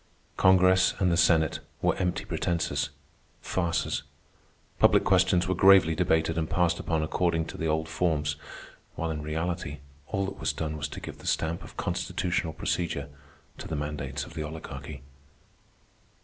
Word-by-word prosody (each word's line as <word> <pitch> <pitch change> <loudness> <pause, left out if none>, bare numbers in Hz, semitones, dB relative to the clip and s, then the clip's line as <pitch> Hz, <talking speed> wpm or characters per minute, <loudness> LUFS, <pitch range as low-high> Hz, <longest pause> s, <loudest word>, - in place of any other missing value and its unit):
Congress 95 0 +5
and 90 -3 +2
the - - +3
Senate 80 -2 +3 0.2
were - - +2
empty 95 +1 -1
pretences, 85 -2 -1 0.5
farces. 85 -3 -1 0.8
Public - - +5
questions 90 -1 +3
were 95 - +1
gravely 95 -3 +6
debated 80 +1 +1
and 80 - -2
passed 85 -1 +1
upon 80 -2 0
according 80 0 0
to - - -8
the 80 - -2
old 80 0 0
forms, 80 -3 0 0.6
while 80 0 -2
in 75 -1 -4
reality 80 0 -3 0.3
all 95 0 -1
that 100 - -6
was - - 0
done 80 -1 -3
was 75 - -3
to - - -8
give - - -8
the - - -10
stamp 80 +1 0
of - - -13
constitutional 90 -2 -1
procedure 85 -4 -2 0.5
to - - -6
the 80 - -3
mandates 75 -2 -4
of 85 - -12
the 80 - -4
Oligarchy. 75 -3 -7
80 Hz, 155 wpm, -28 LUFS, 80-90 Hz, 0.8 s, gravely